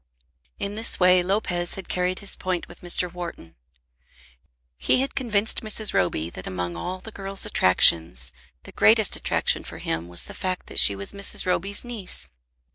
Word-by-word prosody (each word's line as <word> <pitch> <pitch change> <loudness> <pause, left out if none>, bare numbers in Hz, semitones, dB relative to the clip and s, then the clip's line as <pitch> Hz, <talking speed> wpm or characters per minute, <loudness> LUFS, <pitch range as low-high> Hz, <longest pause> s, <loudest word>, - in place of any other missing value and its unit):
In 200 - -4
this 225 +2 +3
way 180 0 +5
Lopez 175 -2 -2
had 195 - -8
carried 180 0 -1
his 200 - -1
point 185 -2 -4
with 175 - -15
Mr. 175 0 0
Wharton. 170 - -8 1.3
He - - +2
had 270 - -2
convinced 220 -5 0
Mrs. 215 -1 +1
Roby 85 -2 -1
that 95 - -9
among 90 -2 -4
all 180 - -6
the 220 - -11
girl's 195 -1 -3
attractions 80 -8 +3 0.3
the - - -13
greatest - - +4
attraction - - 0
for - - -9
him 80 +1 -4
was 85 0 -2
the - - -10
fact 185 -1 -4
that - - 0
she 100 - +9
was 100 0 -2
Mrs. 200 0 -1
Roby's 195 +2 -1
niece. 230 -7 -2
180 Hz, 170 wpm, -23 LUFS, -, 1.3 s, she